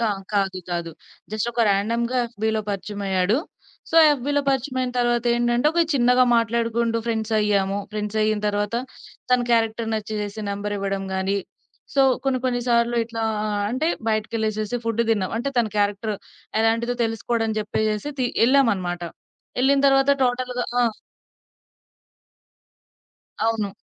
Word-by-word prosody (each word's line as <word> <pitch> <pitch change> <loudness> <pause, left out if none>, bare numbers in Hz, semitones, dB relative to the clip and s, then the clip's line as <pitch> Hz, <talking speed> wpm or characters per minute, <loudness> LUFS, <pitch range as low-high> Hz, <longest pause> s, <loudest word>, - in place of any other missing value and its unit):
క - - -2 0.3
కాదు. 195 -2 +1
కాదు. 170 -1 -2 0.4
జస్టొక 235 +2 -1
ర్యాండమ్‌గా 230 +5 +1
యఫ్‌బీలో 220 -1 -1
పరిచయమయ్యాడు. 200 0 -1 0.5
సో 330 - +1
యఫ్‌బీలో 285 0 +1
పరిచయమయిన 260 -1 -1
తర్వాతేంటంటే 240 +1 +2
ఒక 340 - +2
చిన్నగా 250 0 +4
మాట్లాడుకుంటూ 230 0 +1
ఫ్రెండ్సయ్యాము. 210 -3 +1
ఫ్రెండ్సయిన 215 0 0
తర్వాత 205 +2 -1 0.6
తన 250 - +5
క్యారెక్టర్ 225 -1 +1
నచ్చేసేసి 215 0 -4
నంబరివ్వడం 200 -1 -3
గానీ 190 +1 0 0.6
సో 275 - +5 0.2
కొన్ని 265 -1 +1
కొన్ని 245 -1 +1
సార్లు 235 0 +2
ఇట్లా 225 0 -5 0.2
ఆహ్, 210 -1 -1
అంటే 260 +6 -1 0.2
బయటికెళ్ళేసేసి 215 +1 -1
ఫుడ్ 230 0 0
దిన్నాం. 200 -4 +1
అంటే 240 +5 -1
తన 230 - +3
క్యారెక్టర్ 205 +1 0 0.5
ఎలాంటిదో 230 +2 +1
తెలుసుకోడం 225 0 -1
అని 220 - -2
జెప్పేసెసి 215 +4 -1
తి 250 - +2 0.2
ఎళ్ళామనమాట. 200 -10 +2 0.6
ఎళ్ళిన 275 +2 +4
తర్వాత 270 +1 +4
టోటల్‌గా 250 0 0 0.2
ఆ! - - +4 2.6
అవును. 215 -3 -1
225 Hz, 115 wpm, -23 LUFS, 205-240 Hz, 2.6 s, తన